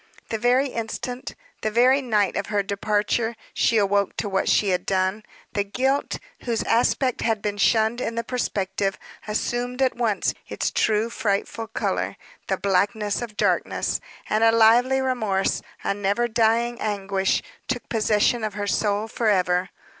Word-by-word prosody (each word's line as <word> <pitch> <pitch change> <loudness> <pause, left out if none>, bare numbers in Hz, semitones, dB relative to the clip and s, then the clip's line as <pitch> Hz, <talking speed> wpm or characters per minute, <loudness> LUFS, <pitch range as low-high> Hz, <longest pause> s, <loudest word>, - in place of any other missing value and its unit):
The 225 - -2
very 250 +4 +3
instant 245 +2 -5 0.3
the 215 - 0
very 250 +5 +4
night 215 -6 +1
of 200 - -2
her 205 -2 0
departure, 210 +3 0 0.2
she 230 - +2
awoke 200 -1 +1
to - - -2
what 195 -1 0
she 205 - +3
had 180 -1 +1
done. 190 +2 0 0.3
The 205 - +1
guilt, 265 +7 0 0.2
whose 235 -2 -1
aspect 245 +2 +1
had 225 -2 +1
been 205 0 -3
shunned 220 +3 +3
in 230 - -2
the 230 - -1
prospective, 195 -5 -2 0.3
assumed 245 +4 -2
at 260 -1 +2
once 230 -4 0 0.2
its - - -1
true 220 +2 +1
frightful 220 -1 -2
color, - - -2 0.3
the - - 0
blackness 200 +2 0
of 225 -3 -7
darkness; - - 0 0.3
and 215 +1 +1
a 225 - +6
lively 235 +4 +5
remorse, 220 -7 0 0.2
a - - +1
never 205 +4 0
dying 235 +1 +1
anguish, 195 -2 0 0.2
took 250 -2 -3
possession 220 +1 +2
of 215 -2 -3
her 205 -1 -2
soul 205 +1 0
forever. 185 -5 +1
220 Hz, 155 wpm, -24 LUFS, 200-240 Hz, 0.3 s, a